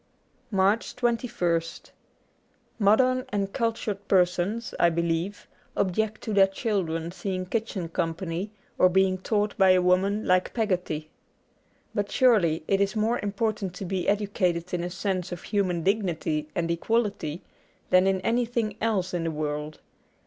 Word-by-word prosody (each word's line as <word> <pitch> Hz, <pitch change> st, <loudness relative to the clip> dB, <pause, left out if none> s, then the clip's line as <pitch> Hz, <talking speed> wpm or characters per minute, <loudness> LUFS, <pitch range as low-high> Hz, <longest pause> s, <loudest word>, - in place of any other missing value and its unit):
'' -, -, -40 dB
86 -, -, -37 dB
MARCH 195 Hz, +4 st, +2 dB
2 250 Hz, -, -3 dB
1 235 Hz, -1 st, +3 dB, 0.4 s
St 165 Hz, -, -11 dB, 0.9 s
MODERN 255 Hz, +5 st, +4 dB
and 200 Hz, -1 st, -2 dB
cultured 225 Hz, -4 st, -2 dB
persons, 185 Hz, +4 st, +1 dB
I 170 Hz, -, +5 dB
believe, 170 Hz, +3 st, -2 dB, 0.3 s
object 215 Hz, +3 st, 0 dB
to 220 Hz, -, -3 dB
their 195 Hz, -1 st, +6 dB
children 185 Hz, -6 st, -2 dB
seeing 185 Hz, 0 st, -3 dB
kitchen 200 Hz, -3 st, -3 dB
company 165 Hz, +3 st, -3 dB, 0.3 s
or 185 Hz, -, +6 dB
being 190 Hz, 0 st, +2 dB
taught 210 Hz, +1 st, 0 dB
by 190 Hz, -1 st, +7 dB
a 185 Hz, -, +4 dB
woman 195 Hz, +4 st, +2 dB
like 185 Hz, 0 st, +2 dB
Peggotty. 180 Hz, -8 st, -1 dB, 0.8 s
But 205 Hz, -1 st, -1 dB
surely 195 Hz, -12 st, +3 dB
it 195 Hz, 0 st, +2 dB
is 195 Hz, +1 st, +1 dB
more 220 Hz, +3 st, +1 dB
important 205 Hz, -2 st, -2 dB
to 195 Hz, -, -5 dB
be 185 Hz, 0 st, -2 dB
educated 185 Hz, -4 st, 0 dB
in 175 Hz, -1 st, -1 dB
a 175 Hz, -, -3 dB
sense 185 Hz, 0 st, -2 dB
of 175 Hz, -, -6 dB
human 185 Hz, -5 st, 0 dB
dignity 165 Hz, -6 st, 0 dB
and 170 Hz, -1 st, 0 dB
equality 195 Hz, -4 st, -1 dB, 0.5 s
than 185 Hz, +1 st, +5 dB
in 190 Hz, -1 st, +1 dB
any 235 Hz, +4 st, +1 dB
thing 225 Hz, -3 st, -2 dB
else 195 Hz, -5 st, 0 dB
in 175 Hz, -2 st, -1 dB
the 165 Hz, -, -1 dB
world. 150 Hz, 0 st, -4 dB
190 Hz, 155 wpm, -26 LUFS, 175-215 Hz, 0.9 s, by